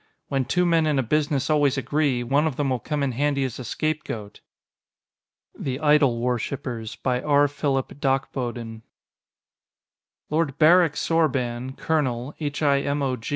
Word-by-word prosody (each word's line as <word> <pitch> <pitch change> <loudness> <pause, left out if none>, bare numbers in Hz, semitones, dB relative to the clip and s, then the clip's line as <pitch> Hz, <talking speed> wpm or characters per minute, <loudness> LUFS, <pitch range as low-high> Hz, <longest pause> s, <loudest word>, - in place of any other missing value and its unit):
"When 135 -2 0
two 180 +6 +1
men 165 -2 +3
in 150 -2 +1
a 135 - +2
business 145 +1 0
always 145 -3 +2
agree, 135 -1 0
one 140 +6 +2
of 145 - -3
them 140 -1 -1
will 130 - 0
come 150 +3 -2
in 135 - 0
handy 140 +2 0
as 130 -2 -4
a - - -5
scapegoat."_ 120 -6 -4 1.2
THE 130 -1 -2
IDLE 150 -5 +4
WORSHIPERS 120 -1 -3
by 125 -1 -1
R. 145 -1 +4
Phillip 140 -2 -1
Dachboden 125 -4 -2 1.5
Lord 155 -3 0
Barrick 165 0 +5
Sorban, 130 -6 -1
Colonel, 135 -4 -1
H.I.M.O. 140 -3 0
140 Hz, 135 wpm, -24 LUFS, 125-150 Hz, 1.5 s, Barrick